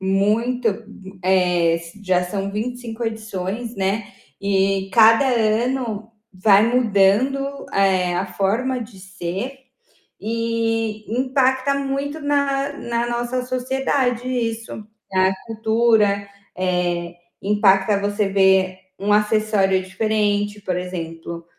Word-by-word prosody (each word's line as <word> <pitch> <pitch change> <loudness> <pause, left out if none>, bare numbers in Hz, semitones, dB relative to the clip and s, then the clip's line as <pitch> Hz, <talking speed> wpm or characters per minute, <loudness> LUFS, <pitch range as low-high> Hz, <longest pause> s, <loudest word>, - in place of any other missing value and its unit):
Muito, 215 +6 +1
hu 195 -3 -7
eh, 180 -3 +3
s 170 +5 -11
já 180 -2 +1
são 195 +2 -3
25 235 +2 -4
edições, 220 +1 -4
né, 195 +2 -1 0.3
e 195 -1 +1
cada 225 +4 +6
ano 230 -1 0 0.2
vai 195 +2 +5
mudando, 250 +5 +2
eh, 185 -2 +2
a 185 +2 -1
forma 230 +8 -1
de 215 -3 -13
ser 190 +7 -5 0.6
e 225 -1 -1 0.2
impacta 265 +1 +1
muito 280 +2 -3
na 280 -1 0
na 235 -2 -2
nossa 240 +1 -2
sociedade 255 -1 -1
isso, 230 -3 -3 0.3
na 190 0 +3
cultura, 220 -2 +2 0.3
eh, 175 -1 -1 0.3
impacta 200 0 +3
você 205 0 0
ver 190 -1 +3 0.2
um 205 +2 0
acessório 210 -2 +2
diferente, 205 +1 -1
por 185 -2 -2
exemplo, 170 -2 -6
210 Hz, 105 wpm, -21 LUFS, 190-240 Hz, 0.6 s, cada